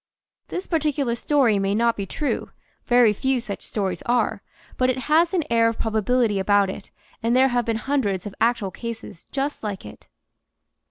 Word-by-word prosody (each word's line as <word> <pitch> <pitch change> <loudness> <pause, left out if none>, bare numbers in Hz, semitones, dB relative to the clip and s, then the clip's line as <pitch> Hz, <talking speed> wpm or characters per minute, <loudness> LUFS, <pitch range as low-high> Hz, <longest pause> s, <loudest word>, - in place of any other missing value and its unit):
This 365 - -4
particular 295 -6 0
story 240 -4 +2
may 195 +1 0
not 235 +1 +2
be 200 -1 -4
true 290 +9 -2 0.4
(very 240 -3 +5
few 265 +4 0
such 220 -4 -6
stories 190 -5 -3
are), 225 -3 +1 0.3
but 255 0 +2
it 255 - 0
has 325 +3 +4
an 360 -4 +1
air 230 -1 +4
of 230 - -1
probability 220 -1 +1
about 200 0 +3
it 195 - -10 0.3
and 230 +1 +1
there 265 +1 +5
have 245 -1 0
been 230 - 0
hundreds 225 -8 -1
of 205 - -6
actual 225 -4 +1
cases 225 -4 -8
just 280 +2 -2
like 205 -3 -5
it. - - -13
230 Hz, 175 wpm, -23 LUFS, 205-260 Hz, 0.4 s, very